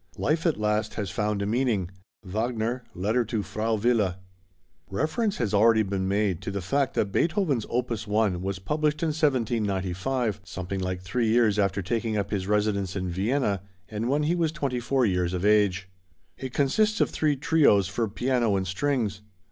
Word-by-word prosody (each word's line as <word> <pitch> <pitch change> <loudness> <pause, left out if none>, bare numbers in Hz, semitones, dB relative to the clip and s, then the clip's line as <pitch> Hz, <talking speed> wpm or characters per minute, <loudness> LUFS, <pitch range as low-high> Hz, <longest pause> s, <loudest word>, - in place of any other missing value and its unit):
Life 160 +4 +1
at 160 - +1
last 105 0 0
has 100 -4 -3
found 105 +2 -1
a - - -1
meaning. 110 -5 0 0.3
WAGNER: 115 +4 -2
Letter 110 +7 +1
to 110 -2 -2
Frau 110 +2 -1
Wille. 110 -4 +1 0.7
Reference 160 - -1
has 110 -4 -1
already 110 +2 +5
been 95 -1 -2
made 100 -3 0
to 95 - -4
the 100 0 -3
fact 135 +9 0
that 100 - 0
Beethoven's 160 - +1
opus 120 -3 -2
1 105 -4 +1
was 95 0 -2
published 150 - -1
in 165 - +2
1795, 115 - 0
something 95 +1 -5
like 90 -1 -3
three 115 +6 -1
years 110 -2 +3
after 100 -1 +1
taking 110 +2 -1
up 100 -1 -2
his 95 -3 -2
residence 105 -2 0
in 95 -2 -2
Vienna, 100 +2 0 0.3
and 110 +2 -3
when 145 +2 +2
he 155 +3 +2
was 165 -3 +1
twenty 140 -6 -2
four 125 +2 +1
years 90 -3 0
of 90 +2 -2
age. 100 -3 +3 0.5
It 130 -1 -6
consists 210 - +2
of - - +2
three 150 -2 +1
Trios 135 - +3
for 110 +4 -1
piano 120 0 +1
and 95 -1 0
strings. 105 +1 -1
110 Hz, 175 wpm, -26 LUFS, 100-130 Hz, 0.7 s, already